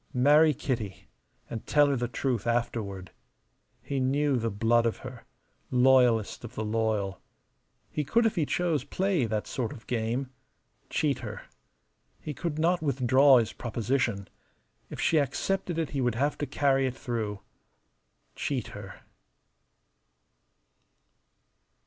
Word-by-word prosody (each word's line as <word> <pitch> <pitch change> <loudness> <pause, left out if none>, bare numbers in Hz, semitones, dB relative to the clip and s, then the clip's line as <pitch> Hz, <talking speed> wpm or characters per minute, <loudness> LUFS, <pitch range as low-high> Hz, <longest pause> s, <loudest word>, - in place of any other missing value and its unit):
Marry 150 +4 +5
Kitty, 105 -8 -4 0.4
and 115 - -7
tell 145 -1 +5
her 140 -1 +1
the 120 -1 -1
truth 120 -2 -2
afterward. 105 -6 -2 0.7
He 140 -1 -2
knew 140 +2 +1
the 115 -1 -1
blood 115 +3 +2
of 115 - -2
her 125 -3 -9 0.4
loyalest 125 -4 +3
of 120 +1 -9
the 110 - -3
loyal. 105 -3 -1 0.7
He 150 - -1
could 230 - +2
if 225 - +2
he 160 -5 0
chose 165 -6 0
play 180 -3 0
that 110 -1 -2
sort 120 -4 -3
of 125 -6 -11
game 120 +3 -2 0.6
cheat 140 -4 0
her. 110 -4 -7 0.8
He 150 - -6
could 155 +2 -4
not 170 +2 +2
withdraw 135 -1 +5
his 115 -2 0
proposition. 115 -3 -1 0.6
If - - -8
she 160 - +3
accepted 170 +5 -1
it 165 -3 -1
he 140 - -1
would 125 -3 +1
have 145 +5 0
to 145 - -2
carry 135 -2 +2
it 130 - -4
through. 110 -6 -4 0.9
Cheat 130 -6 -2
her. 100 -2 -10
125 Hz, 135 wpm, -28 LUFS, 115-145 Hz, 0.9 s, Marry